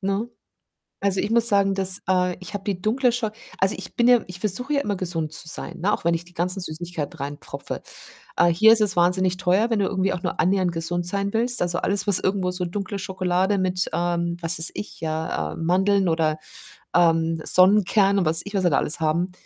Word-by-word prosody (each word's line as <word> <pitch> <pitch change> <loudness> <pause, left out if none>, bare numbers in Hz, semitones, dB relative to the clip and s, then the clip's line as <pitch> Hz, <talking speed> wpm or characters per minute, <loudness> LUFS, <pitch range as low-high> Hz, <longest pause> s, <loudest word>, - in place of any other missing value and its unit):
ne? 200 +4 -2 0.7
Also, 195 -1 0
ich 205 - -3
muss 235 0 +4
sagen, 200 -1 +2
das 190 0 +5
äh, 180 -1 +1
ich 185 - -10
habe 195 - -5
die 190 -3 -3
dunkle 245 +4 +1
Scho 230 -2 -2 0.3
also, 190 +1 +1
ich - - -8
bin 240 0 +2
ja 245 -2 +5
ich 180 0 -8
versuche 235 +8 0
ja 280 - +2
immer 205 -4 -2
gesund 165 -4 -3
zu 160 - -6
sein, 170 +2 -1
ne, 205 +3 +1
auch - - -3
wenn 170 0 +2
ich 165 - -5
die 175 - -18
ganzen 180 +2 -1
Süßigkeiten 170 -1 -5
reinpfropfe. 145 +1 -7 0.5
Äh, - - +4
hier 215 +7 +5
ist 220 - +1
es 200 -3 +1
wahnsinnig 180 +1 +2
teuer, 190 +5 +1
wenn 225 - 0
du 195 - +1
irgendwie 195 -1 -1
auch 175 - -6
nur 180 - -4
annähernd 185 0 +1
gesund 170 +1 -3
sein 200 +1 -1
willst. 240 +2 +2
Also 175 0 0
alles, 200 0 -1
was 200 - +6
irgendwo 190 -1 -1
so 180 0 -3
dunkle 195 +2 -5
Schokolade 185 +1 -1
mit, 185 -1 -1
ähm, 170 0 -1
was 165 0 +1
weiß 160 - +3
ich, 205 - -7
ja, 155 - -3
äh, - - -10
Mandeln 190 +3 +1
oder, 160 -1 0 0.6
ähm, 165 -1 +2
Sonnenkernen 200 +1 +4
und 180 - 0
was 160 +1 +3
ich 205 - -8
was 190 - 0
wir 175 - +3
da - - +2
alles 150 - +2
haben, 170 +4 0
185 Hz, 220 wpm, -23 LUFS, 170-200 Hz, 0.7 s, was